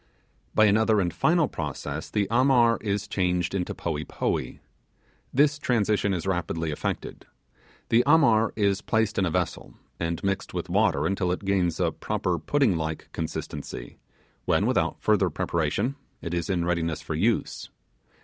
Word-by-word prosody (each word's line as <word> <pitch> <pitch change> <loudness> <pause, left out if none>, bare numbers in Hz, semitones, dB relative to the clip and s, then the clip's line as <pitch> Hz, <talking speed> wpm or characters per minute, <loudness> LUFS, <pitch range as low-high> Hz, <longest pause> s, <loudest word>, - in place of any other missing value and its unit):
By 110 - +6
another 110 +1 +4
and 90 -4 0
final 160 - +3
process 75 - -5
the 105 -2 0
'Amar' 120 -2 +4
is 105 0 -2
changed 90 -3 0
into 90 -2 -2
'Poee 75 - -3
Poee'. - - -3 0.7
This 145 +2 +3
transition 105 -6 +1
is 90 -2 -2
rapidly 85 -3 -1
effected. 75 - -4 0.6
The 115 - +5
Amar 115 -9 +5
is 100 -2 +1
placed 110 -2 0
in 95 - +2
a - - 0
vessel, - - -3 0.2
and 85 0 -2
mixed 100 0 -2
with - - -3
water 70 +2 +2
until 90 0 0
it 90 +2 -3
gains 90 -4 +1
a - - +2
proper - - -2
pudding 135 -10 +2
like 80 0 -4
consistency, 80 -6 -6 0.5
when, - - +2
without - - +1
further - - +2
preparation, 90 - -1 0.2
it 85 - -5
is 85 -2 -2
in 90 -3 0
readiness 85 -3 -1
for 80 - -4
use. 110 +9 0
95 Hz, 150 wpm, -26 LUFS, 85-110 Hz, 0.7 s, By